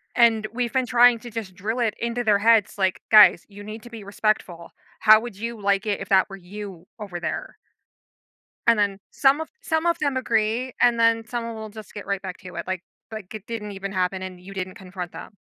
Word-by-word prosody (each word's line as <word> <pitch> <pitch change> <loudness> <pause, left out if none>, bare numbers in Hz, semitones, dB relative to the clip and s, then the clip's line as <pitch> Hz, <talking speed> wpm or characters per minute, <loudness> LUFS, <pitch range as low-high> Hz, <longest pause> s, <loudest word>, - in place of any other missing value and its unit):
And 225 -3 +4
we've 240 0 -2
been 260 -2 +1
trying 245 -1 +5
to 240 - -9
just 215 -4 -6
drill 220 +7 -3
it 225 -3 +1
into 235 +1 -2
their 210 -2 +3
heads, 225 -2 +3
like, 190 -1 +1
"Guys, 215 -1 +8
you 205 0 -12
need 215 +1 -8
to 240 - -11
be 220 -3 -8
respectful. 200 -4 -2 0.3
How 215 0 +8
would 225 -4 -8
you 230 0 -5
like 200 +1 +1
it 205 -1 -1
if 195 - -7
that 190 -1 +4
were 195 - -9
you 190 -1 -9
over 190 -4 -6
there?" - - -4 1.1
And 230 -2 +6
then 200 -1 0
some 275 +2 +3
of 320 - -4
some 320 0 -1
of 340 0 +2
them 285 -3 0
agree, 235 +1 0
and 235 -1 +4
then 230 0 +3
someone 230 0 -4
will 220 -1 -7
just 215 0 -11
get 205 - -8
right 200 -1 -2
back 185 -2 -6
to 185 -2 -11
it, 170 - -5
like 185 -1 -3 0.3
like 215 -2 -8
it 215 -1 -8
didn't 215 -3 -5
even 195 0 -6
happen 185 0 -1
and 185 -1 -7
you 195 +2 -11
didn't 185 -1 -5
confront 180 -2 -8
them. 205 - -10
215 Hz, 225 wpm, -24 LUFS, 195-230 Hz, 1.1 s, Guys